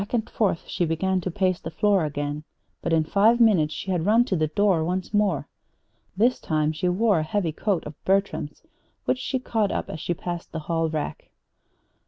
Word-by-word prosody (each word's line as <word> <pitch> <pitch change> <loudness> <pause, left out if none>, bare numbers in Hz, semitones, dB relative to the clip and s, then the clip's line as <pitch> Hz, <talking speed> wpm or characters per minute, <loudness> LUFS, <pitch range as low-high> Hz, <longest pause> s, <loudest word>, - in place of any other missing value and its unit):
Back 205 +4 -3
and 225 -1 -1
forth 195 -6 -1
she - - -1
began 185 +3 0
to 185 - -3
pace 185 -1 0
the 160 - -6
floor 195 +1 +2
again; 145 0 -3 0.4
but 170 - -2
in 160 -1 +3
five 210 +8 +3
minutes 190 -10 +4
she 190 +5 -4
had 175 -3 0
run 225 +5 +4
to 200 - -1
the 155 -2 +1
door 180 +1 +2
once 185 +4 -3
more. 205 -1 +1 0.7
This 240 +5 +3
time 155 -1 0
she 180 +3 -1
wore 200 0 +2
a - - 0
heavy 170 +1 -1
coat 190 +3 -1
of 150 0 -10
Bertram's 195 -6 -1 0.4
which 255 - +1
she 260 +1 -1
caught 225 -5 0
up - - -3
as 155 - -6
she 175 +3 -2
passed 175 0 -6
the 160 - -3
hall 165 +1 -1
rack. 155 -1 -4
180 Hz, 205 wpm, -25 LUFS, 160-205 Hz, 0.7 s, minutes